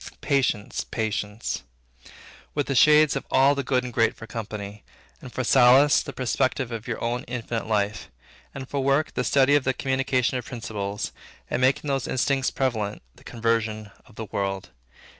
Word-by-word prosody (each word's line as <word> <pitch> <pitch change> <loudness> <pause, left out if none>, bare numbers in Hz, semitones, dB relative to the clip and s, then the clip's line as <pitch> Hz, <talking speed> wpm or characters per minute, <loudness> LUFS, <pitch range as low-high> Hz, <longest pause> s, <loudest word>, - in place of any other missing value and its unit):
Patience, 130 -7 0
patience; 110 -1 -3 0.9
with 145 -2 0
the 140 - -2
shades 150 +2 +6
of - - -2
all 135 +2 +5
the 140 - -2
good 130 -1 +1
and 125 -1 -6
great 115 -1 +2
for 115 - -10
company; 105 -2 -7 0.4
and 125 - -10
for 130 - -3
solace, 130 +3 +6
the - - -7
perspective 130 0 -1
of 115 -1 -6
your 115 - -3
own 120 +1 -1
infinite 115 -2 -4
life; 105 -1 -1 0.4
and 135 -1 -8
for 140 -1 -2
work, 140 +3 +1
the 125 - -1
study 135 +3 +3
and 145 - +3
the 130 -1 0
communication 130 -1 0
of - - -9
principles, 105 -4 -4 0.4
the - - 0
making 130 +3 +2
those 135 -2 -1
instincts 135 +1 +1
prevalent, 110 - -2
the - - -18
conversion 115 -3 -1 0.2
of 120 - -19
the 110 - -5
world. 100 -2 -3
125 Hz, 170 wpm, -25 LUFS, 110-135 Hz, 0.9 s, shades